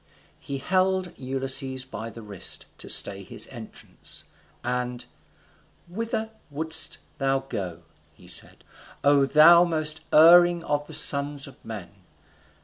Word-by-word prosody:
He 140 Hz, -, -7 dB
held 185 Hz, +4 st, -1 dB
Ulysses 130 Hz, 0 st, -1 dB
by 115 Hz, -3 st, -8 dB
the 115 Hz, 0 st, -12 dB
wrist, 100 Hz, -3 st, -5 dB
to -, -, -9 dB
stay -, -, +2 dB
his -, -, -3 dB
entrance; -, -, -9 dB, 0.4 s
and 125 Hz, 0 st, -4 dB, 0.8 s
"Whither 220 Hz, +3 st, -5 dB, 0.2 s
wouldest 160 Hz, +2 st, +3 dB, 0.2 s
thou 135 Hz, -1 st, 0 dB
go?" 90 Hz, -10 st, -7 dB, 0.3 s
he -, -, -19 dB
said, -, -, -2 dB, 0.4 s
"O 140 Hz, -1 st, +3 dB
thou 165 Hz, +4 st, +6 dB
most 160 Hz, -2 st, 0 dB
erring 175 Hz, +2 st, +6 dB
of 145 Hz, -1 st, -3 dB
the 160 Hz, -, -3 dB
sons 145 Hz, -1 st, +4 dB
of 140 Hz, -, -13 dB
men! 105 Hz, -6 st, -9 dB
140 Hz, 125 wpm, -24 LUFS, 130-165 Hz, 0.8 s, thou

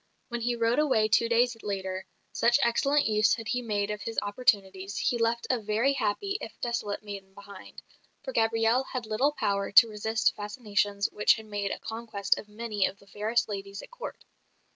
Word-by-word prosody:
When 240 Hz, -1 st, -3 dB
he 240 Hz, +1 st, 0 dB
rode 230 Hz, +3 st, +2 dB
away 260 Hz, -8 st, +3 dB
two 225 Hz, +2 st, +3 dB
days 240 Hz, +1 st, +3 dB
later, 190 Hz, -2 st, -4 dB, 0.2 s
such 235 Hz, +2 st, +3 dB
excellent 275 Hz, +5 st, +2 dB
use 215 Hz, -1 st, +3 dB
had 225 Hz, -2 st, -8 dB
he 250 Hz, -1 st, 0 dB
made 210 Hz, -3 st, -1 dB
of 210 Hz, -1 st, -5 dB
his 225 Hz, +2 st, -5 dB
opportunities, 200 Hz, -3 st, 0 dB
he 240 Hz, -, 0 dB
left 230 Hz, +1 st, +1 dB
a 250 Hz, -, +1 dB
very 220 Hz, +6 st, +1 dB
happy, 275 Hz, -, -1 dB
if -, -, -8 dB
desolate 235 Hz, -4 st, -3 dB
maiden 195 Hz, -2 st, -9 dB
behind; 200 Hz, 0 st, -12 dB, 0.4 s
for -, -, -5 dB
Gabrielle 225 Hz, +3 st, +2 dB
had 255 Hz, -3 st, -3 dB
little 235 Hz, +7 st, +1 dB
power 200 Hz, -7 st, -1 dB
to 230 Hz, -, +9 dB
resist 220 Hz, +1 st, 0 dB
fascinations 205 Hz, -2 st, -1 dB
which 210 Hz, -, +4 dB
had 220 Hz, -, -9 dB
made 205 Hz, -2 st, -3 dB
a -, -, -3 dB
conquest 220 Hz, -3 st, -2 dB
of 210 Hz, -, -11 dB
many 210 Hz, -2 st, -1 dB
of 195 Hz, -, -8 dB
the 200 Hz, -, -20 dB
fairest 220 Hz, +4 st, 0 dB
ladies 200 Hz, -1 st, -6 dB
at -, -, -13 dB
Court. -, -, -7 dB
220 Hz, 185 wpm, -28 LUFS, 205-235 Hz, 0.4 s, to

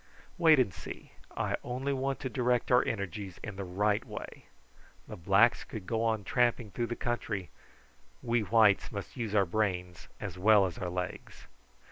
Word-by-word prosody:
Wait 160 Hz, -3 st, +7 dB
and 120 Hz, -8 st, +2 dB
see. -, -, -9 dB, 0.3 s
I -, -, 0 dB
only 130 Hz, +3 st, -2 dB
want 135 Hz, 0 st, -2 dB
to -, -, -2 dB
direct 125 Hz, -2 st, 0 dB
our 125 Hz, -, +6 dB
energies 100 Hz, -3 st, -4 dB
in 110 Hz, -, -6 dB
the 100 Hz, -, -5 dB
right 100 Hz, +3 st, 0 dB
way. -, -, -9 dB, 0.6 s
The -, -, -7 dB
blacks 100 Hz, +7 st, +3 dB
could 105 Hz, -4 st, -8 dB
go 115 Hz, +2 st, -1 dB
on 110 Hz, -2 st, 0 dB
tramping 120 Hz, 0 st, +1 dB
through 120 Hz, +5 st, -2 dB
the 120 Hz, -, -3 dB
country; 110 Hz, -6 st, -3 dB, 0.7 s
we 120 Hz, -1 st, +1 dB
whites 105 Hz, -1 st, +4 dB
must 100 Hz, -2 st, -7 dB
use 115 Hz, -5 st, -3 dB
our 100 Hz, -2 st, +4 dB
brains 90 Hz, -2 st, -2 dB
as 90 Hz, -, -6 dB
well 105 Hz, 0 st, +6 dB
as 90 Hz, -3 st, -5 dB
our 90 Hz, -, -3 dB
legs." 90 Hz, +1 st, -6 dB
110 Hz, 170 wpm, -31 LUFS, 95-120 Hz, 0.7 s, Wait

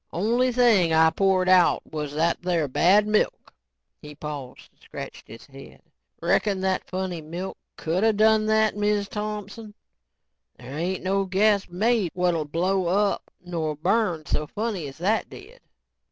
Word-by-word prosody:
Only 235 Hz, +8 st, +1 dB
thing 230 Hz, -9 st, +3 dB
I 160 Hz, 0 st, +5 dB
poured 190 Hz, +1 st, +1 dB
out 185 Hz, -1 st, +4 dB
was 150 Hz, -2 st, -5 dB
that 165 Hz, +2 st, +1 dB
there 175 Hz, -4 st, 0 dB
bad 185 Hz, +10 st, +4 dB
milk." 215 Hz, 0 st, -1 dB, 0.5 s
He 150 Hz, 0 st, -11 dB
paused 145 Hz, -4 st, -8 dB
and -, -, -38 dB
scratched -, -, -9 dB
his 115 Hz, +2 st, -12 dB
head. 135 Hz, -1 st, -14 dB, 0.4 s
"Reckon 200 Hz, -3 st, +1 dB
that 190 Hz, -1 st, -1 dB
funny 185 Hz, -2 st, -4 dB
milk 170 Hz, +5 st, -6 dB, 0.2 s
coulda 185 Hz, +8 st, +1 dB
done 215 Hz, 0 st, +3 dB
that, 220 Hz, -1 st, +2 dB
Miz 205 Hz, -1 st, 0 dB
Thompson? 210 Hz, +1 st, -6 dB, 0.8 s
There 125 Hz, +3 st, -10 dB
ain't 175 Hz, +4 st, -3 dB
no 195 Hz, +1 st, 0 dB
gas 200 Hz, +1 st, +2 dB
made 210 Hz, +1 st, +1 dB
what'll 175 Hz, -3 st, 0 dB
blow 180 Hz, +4 st, 0 dB
up 200 Hz, +3 st, 0 dB, 0.2 s
nor 160 Hz, -3 st, -3 dB
burn 175 Hz, 0 st, 0 dB
so 150 Hz, +1 st, -2 dB
funny 205 Hz, -5 st, -3 dB
as 135 Hz, -, -11 dB
that 200 Hz, +7 st, 0 dB
did." -, -, -13 dB
185 Hz, 150 wpm, -24 LUFS, 160-210 Hz, 0.8 s, I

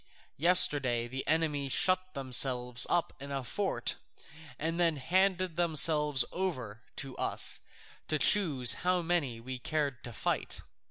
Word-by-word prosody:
Yesterday 140 Hz, -8 st, +5 dB
the 130 Hz, +2 st, -6 dB
enemy 150 Hz, -3 st, -1 dB
shut 185 Hz, +7 st, 0 dB
themselves 125 Hz, -2 st, +2 dB
up 175 Hz, -1 st, -1 dB
in 140 Hz, +1 st, -10 dB
a 135 Hz, -1 st, -4 dB
fort, 195 Hz, -, -3 dB, 0.6 s
and 165 Hz, +3 st, -4 dB
then 165 Hz, -2 st, +1 dB
handed 185 Hz, +4 st, -1 dB
themselves 150 Hz, -5 st, +3 dB
over 130 Hz, -, -5 dB
to 135 Hz, -2 st, -6 dB
us -, -, 0 dB, 0.5 s
to 155 Hz, -, 0 dB
choose 145 Hz, -, +3 dB
how 180 Hz, -1 st, 0 dB
many 160 Hz, -9 st, -2 dB
we 130 Hz, +2 st, -8 dB
cared 140 Hz, -1 st, -3 dB
to 120 Hz, -, -8 dB
fight. 110 Hz, -, -2 dB
145 Hz, 130 wpm, -30 LUFS, 130-175 Hz, 0.6 s, Yesterday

